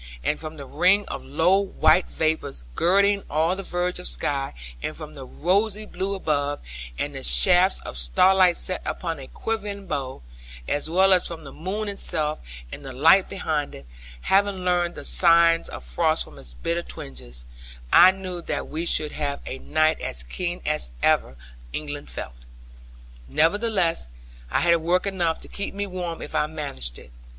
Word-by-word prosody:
And 150 - 0
from 155 0 -8
the 140 - -8
ring 180 +9 +3
of - - -5
low 165 +7 +2
white 175 -3 +2
vapour 160 0 -1 0.2
girding 200 - +3
all 160 +4 +1
the 195 - -5
verge 180 -1 -2
of - - -1
sky, 135 - -1 0.3
and - - -4
from - - -9
the - - -9
rosy 200 - 0
blue 195 +1 -3
above, 145 -5 -1 0.4
and 145 - -3
the 135 - -6
shafts 185 +5 +6
of 65 - -3
starlight 180 - +4
set 185 - -2
upon 165 -4 -4
a 135 - -9
quivering 205 -3 -4
bow, 135 - -4 0.4
as 145 +2 -1
well 190 +3 +5
as 180 - +5
from 165 -2 -7
the 140 - -10
moon 200 +6 -4
itself 160 -6 -2 0.3
and - - -8
the 135 - -7
light 160 +9 +5
behind 155 -6 -2
it, 70 - -12 0.4
having 195 - +1
learned 175 -1 +1
the - - -8
signs 170 -1 +4
of - - -8
frost - - +1
from - - -14
its - - -9
bitter 170 - -2
twinges, 60 - -8 0.5
I 180 - +9
knew 185 -2 -4
that - - -3
we 165 +3 -3
should 150 -2 +1
have 140 -2 -3
a 135 - -6
night 155 +2 +1
as - - -2
keen 175 - -4
as 150 - +1
ever 65 - +2 0.4
England 145 -1 -5
felt. - - -7 0.9
Nevertheless, 170 - +2 0.4
I - - +1
had 170 -1 +4
work 175 +4 0
enough 175 -5 0
to - - -8
keep 200 -1 -5
me 200 0 -2
warm 180 -3 -5
if - - -9
I 150 - +1
managed 140 - -3
it. 60 - -14
165 Hz, 175 wpm, -24 LUFS, 145-185 Hz, 0.9 s, I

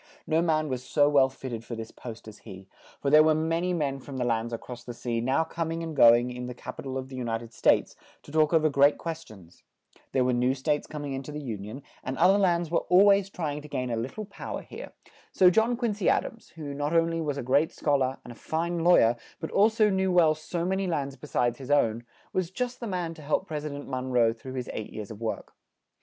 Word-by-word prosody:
No 160 +1 +2
man 155 -2 +1
was 130 -3 -3
so 145 +1 +3
well 140 -2 +4
fit 135 0 -8
ted 115 -1 -5
for 115 - -6
this 115 0 -7
post 115 -2 -10
as 110 -1 -11
he; 95 0 -11 0.3
for 140 - -1
there 155 +1 +8
were 155 0 +4
ma 160 +1 0
ny 180 +1 -1
men 145 -6 -1
from 135 0 -8
the 125 - -1
lands 115 -1 0
a 115 - -2
cross 125 +1 -10
the 120 - -8
sea, 115 -1 -2
now 130 +6 +2
com 165 0 -4
ing 165 0 -4
and 160 -2 -5
go 115 -3 +8
ing 120 +1 -1
in 125 0 -6
the 125 - -7
cap 125 +1 -9
i - - -3
tal 135 -1 -4
of 130 0 -5
the 130 - -8
U 125 - -3
nit 115 -1 -2
ed 115 0 -13
States, - - +2 0.3
to - - -13
talk 155 -1 +3
o 165 - +5
ver 155 -1 +2
great 140 0 +4
ques 165 -1 -5
tions; 95 - -16 0.5
there 130 - +2
were 125 0 +1
new 125 +2 +2
states 145 +2 -1
com 150 -1 -6
ing 140 - -4
in 135 - -3
to 145 - -9
the 150 0 -6
Un 100 0 -7
i - - -7
on; 130 +5 -8 0.2
and 130 0 -4
oth 180 +3 +5
er - - +2
lands 170 -4 +1
were 170 - +2
al 185 +3 +7
ways 200 -1 +4
try 160 -6 -3
ing 150 - -6
to 150 - -11
gain 125 -4 -3
a - - 0
lit 115 +4 -4
tle 215 - -6
pow - - -6
er - - -8
here; - - -9 0.4
so 180 -1 +5
John 225 +5 +2
Quin 235 -3 0
cy 200 -3 -2
Ad - - +3
ams, 230 - -10
who 150 -3 -6
not 145 +3 -2
on 165 0 +3
ly 165 - -2
was 145 -3 -2
a 140 - -3
great 140 +6 +2
schol 145 -2 +1
ar, 130 +1 0
and 120 - -9
a - - -10
fine 170 +6 -2
law 175 +1 +6
yer, 115 +1 +4 0.2
but 160 - -5
al 205 +3 +5
so 215 -2 +2
knew 190 0 +1
well 170 -3 +5
so 170 +2 -4
ma 185 - 0
ny 190 0 -1
lands 140 -5 -2
be 150 - -11
sides 120 -2 0
his 135 0 -9
own, 120 -5 +2 0.3
was 185 -3 0
just 250 +5 -4
the 235 - -5
man 180 -4 -3
to 160 - -13
help 150 +5 0
Pres 155 -3 -4
i - - -4
dent 145 0 -7
Mon 130 -1 -3
roe 120 -3 +3
through 130 +3 -10
his 125 -2 -4
eight 110 - -5
years 105 -1 -7
of 110 0 -10
work. 115 - -4
145 Hz, 295 wpm, -27 LUFS, 125-165 Hz, 0.5 s, there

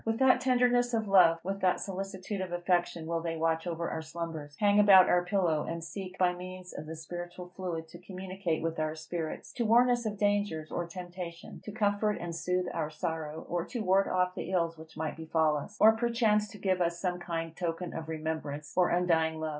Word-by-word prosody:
With 225 0 -1
what 265 -1 +5
tenderness 245 -1 +3
of 220 -2 -1
love, 180 -4 +6
with 195 +2 -3
what 185 -1 +3
solicitude 195 0 -4
of 185 -2 -4
affection 175 -1 0
will 165 0 -1
they 165 -1 -3
watch 165 +1 0
over 170 0 -2
our 160 - -3
slumbers, 160 -2 -6
hang 205 0 +4
about 195 -3 +8
our 180 0 +3
pillow, 180 -5 +1
and 165 0 -4
seek, 185 +2 -7
by 180 -1 +3
means 180 0 -8
of 155 - -7
the 160 - -6
spiritual 175 +2 -8
fluid, 170 -3 -4
to 175 - -11
communicate 185 -2 -4
with 165 -1 -2
our 155 0 -1
spirits, 160 +1 -5
to 240 - +1
warn 240 +3 +5
us 240 -2 0
of 210 -1 -4
dangers 205 -6 0
or 175 - -2
temptation, 175 -1 -8
to 210 - -5
comfort 210 0 +1
and 170 -1 -5
soothe 180 +2 0
our 155 -2 -2
sorrow, 160 -1 -4
or 175 -1 -1
to 240 - -4
ward 195 +1 +3
off 180 0 +1
the 185 - -5
ills 170 -3 +1
which 160 0 -13
might 160 -1 -3
befall 160 -1 +1
us, 175 +9 -6
or 220 - +8
perchance 225 -2 +2
to 205 0 -11
give 190 -2 0
us 170 0 0
some 180 -2 -1
kind 165 -2 -4
token 170 0 -3
of 160 0 -6
remembrance 155 -2 -4
or 180 -1 +4
undying 160 -2 +2
love! 160 0 -2
175 Hz, 210 wpm, -30 LUFS, 165-195 Hz, -, about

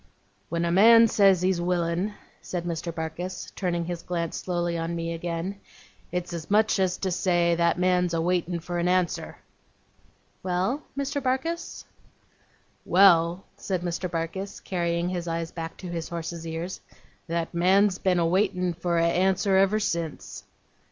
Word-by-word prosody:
'When 170 +1 -1
a 170 - 0
man 230 +5 +7
says 195 -4 +4
he's 185 -2 +1
willin',' 175 +3 -1 0.3
said 175 -2 -4
Mr. 170 0 -3
Barkis, 165 +3 -5
turning 175 -3 -1
his 175 0 -4
glance 170 -2 -3
slowly 175 -1 -2
on 165 +1 -2
me 165 0 -3
again, 170 +3 -4 0.5
'it's 180 0 -3
as 165 -2 -6
much 215 0 +3
as 185 -1 +1
to 190 - -2
say, 175 -1 +2
that 170 0 +2
man's 180 -1 +2
a - - 0
waitin' 175 0 0
for 175 +1 -3
a - - 0
answer.' 180 -1 0 1.0
'Well, 185 +10 -1 0.2
Mr. 280 +1 -2
Barkis?' 275 +6 -2 1.0
'Well,' 175 -1 +5
said 185 -3 -3
Mr. 180 +1 -2
Barkis, 170 +4 -4
carrying 170 -1 -1
his 175 -1 -3
eyes 165 0 -3
back 165 -1 -6
to 185 - -8
his 170 -2 -4
horse's 170 -1 -5
ears; 165 +3 -5 0.5
'that 170 0 -2
man's 190 +3 +3
been 185 -2 +2
a 170 - +2
waitin' 180 0 +1
for 170 +1 -1
a 165 - +3
answer 190 +3 +2
ever 195 +3 +4
since. 170 -7 -4
175 Hz, 155 wpm, -26 LUFS, 170-190 Hz, 1.0 s, man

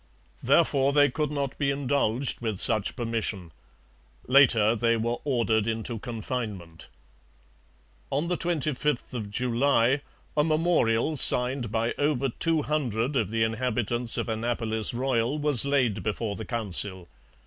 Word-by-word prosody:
Therefore 140 0 +2
they 145 -2 +4
could 150 +2 -2
not 140 -2 -3
be 140 -2 +1
indulged 135 -3 -1
with 110 -4 -3
such 110 -3 0
permission. 115 -7 -4 0.7
Later 120 -5 +4
they 115 0 +1
were 115 +2 -2
ordered 115 -5 +1
into 115 0 -3
confinement. 110 -8 -6 1.2
On 145 +5 -1
the 180 - 0
25th 150 -6 -1
of 110 -4 -5
July 125 +3 +1 0.3
a 150 - +3
memorial 155 -4 +1
signed 125 -2 +4
by 115 +1 -1
over 145 -2 +1
two 160 +5 -1
hundred 135 -3 -1
of 110 -7 0
the 115 0 0
inhabitants 120 0 -1
of - - -2
Annapolis 110 -1 -1
Royal 125 +1 -1
was 145 -5 +5
laid 125 -8 +1
before 105 +1 -3
the 110 - -7
Council. 100 -5 -3
120 Hz, 130 wpm, -26 LUFS, 110-140 Hz, 1.2 s, was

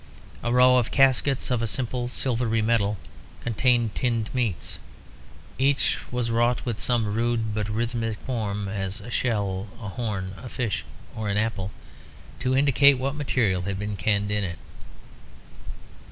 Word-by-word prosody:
A 120 - -1
row 125 +1 +6
of 120 -2 +1
caskets 135 0 +3
of 120 -2 +1
a 115 - 0
simple 120 +2 -1
silvery 120 -3 0
metal 105 -2 +2 0.5
contained 120 -1 +2
tinned 115 -4 -1
meats. 120 -9 -2 0.8
Each 135 +1 +2
was 125 -2 -1
wrought 120 +2 +2
with 120 -4 -2
some 115 -4 +1
rude 115 -1 0
but 105 0 -2
rhythmic 115 0 -1
form, 105 -5 -3
as 95 0 -3
a 105 +4 -9
shell, 100 -5 0
a 105 -4 -5
horn, 100 -4 -3
a 125 - -7
fish, 115 -6 -2 0.3
or 110 -2 -3
an 100 - 0
apple, 105 -3 -1 0.7
to 130 0 +1
indicate 140 0 +6
what 135 +2 -1
material 120 -10 +1
had 95 +1 -3
been 105 +1 -3
canned 100 +2 0
in 105 0 +1
it. 90 -3 -3
115 Hz, 150 wpm, -25 LUFS, 105-125 Hz, 0.8 s, row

